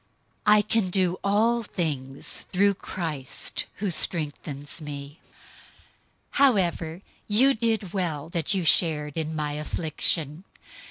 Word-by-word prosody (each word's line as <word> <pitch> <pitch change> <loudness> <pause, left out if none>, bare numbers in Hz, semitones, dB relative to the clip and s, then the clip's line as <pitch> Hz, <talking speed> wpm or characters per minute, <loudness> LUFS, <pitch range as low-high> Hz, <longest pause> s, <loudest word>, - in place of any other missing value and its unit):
004:013 210 - +8
I 210 - +5
can 215 -2 0
do 185 -1 +1
all 225 +4 +2
things 145 - -2
through 200 +2 +3
Christ, 160 -8 -4
who 200 -2 -2
strengthens 150 -2 -1
me. 145 0 -7
004:014 - - -30 1.0
However 180 - +2 0.3
you 255 +6 +5
did 225 -5 -1
well 165 -6 -2
that 170 0 0
you 185 -3 -1
shared 150 -3 +2
in 160 -1 -2
my 150 -1 -2
affliction. 155 +1 0
170 Hz, 120 wpm, -26 LUFS, 150-200 Hz, 1.0 s, 004:013